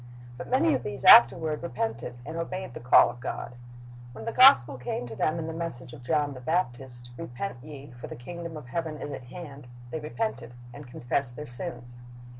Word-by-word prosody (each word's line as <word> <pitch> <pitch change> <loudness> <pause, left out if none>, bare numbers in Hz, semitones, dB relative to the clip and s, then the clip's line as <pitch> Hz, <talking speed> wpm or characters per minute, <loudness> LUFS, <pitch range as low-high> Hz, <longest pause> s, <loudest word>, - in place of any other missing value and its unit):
But - - -8
many 295 +5 +3
of - - 0
these 105 - -6
afterward 150 +6 +7
repented, 120 -4 -4
and 160 +3 -6
obeyed 170 -2 -4
the - - -7
call 125 - +6
of 120 - -14
God. 120 -1 -5 0.6
When 110 -1 -9
the - - -2
gospel 140 - +6
came 125 0 -4
to 115 -2 -8
them 155 +8 0
in 165 - -3
the 160 - -5
message 130 -7 -6
of - - -11
John 145 +2 0
the 130 - -9
Baptist, 125 -5 -3
"Repent 125 +8 -5
ye; 145 -2 -10
for 120 0 -10
the - - -8
kingdom 170 +5 -7
of 135 -5 -11
heaven 160 +1 -3
is 145 - -6
at 130 -2 -7
hand,"' 140 -2 -10 0.2
they 160 - -3
repented, 150 - -4 0.2
and 145 0 -10
confessed 120 +1 -2
their 150 - -7
sins. 120 -2 -8
140 Hz, 200 wpm, -27 LUFS, 120-165 Hz, 0.6 s, afterward